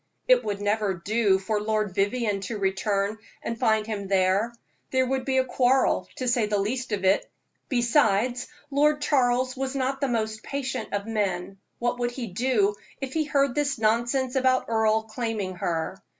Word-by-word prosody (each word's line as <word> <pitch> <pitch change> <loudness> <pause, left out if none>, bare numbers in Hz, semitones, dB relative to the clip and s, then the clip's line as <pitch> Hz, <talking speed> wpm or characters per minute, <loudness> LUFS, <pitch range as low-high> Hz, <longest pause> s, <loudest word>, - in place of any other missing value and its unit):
It - - +5
would 200 -1 -3
never 205 -1 0
do 205 +2 +2
for 205 +2 -2
Lord 215 -2 -1
Vivianne 205 +1 0
to 225 - -4
return 200 +2 0 0.2
and 230 -1 -4
find 220 -3 +2
him 205 -3 -4
there; 195 +3 +2 0.4
there 260 0 +2
would 260 0 -1
be 265 -1 +1
a 260 - +3
quarrel, 255 +1 +2
to 255 - -3
say 240 -3 +2
the 210 0 0
least 240 +5 -2
of 195 -2 -1
it. 190 +2 +3 0.4
Besides, 240 -2 +2 0.2
Lord 295 +2 +3
Charles 255 -2 +2
was 270 0 -3
not 270 +1 -1
the 275 - +2
most 220 -3 -2
patient 265 -4 -4
of 200 0 -1
men. 195 -4 -2 0.2
What 240 +1 -1
would 240 0 +1
he 245 0 -5
do 210 0 +1 0.3
if 270 -1 -5
he 315 -1 +1
heard 280 -3 +2
this 285 -1 0
nonsense 240 +4 +1
about 260 -1 +3
Earle 220 -1 +2
claiming 220 -5 -3
her? 170 +2 -2
230 Hz, 175 wpm, -26 LUFS, 205-260 Hz, 0.4 s, It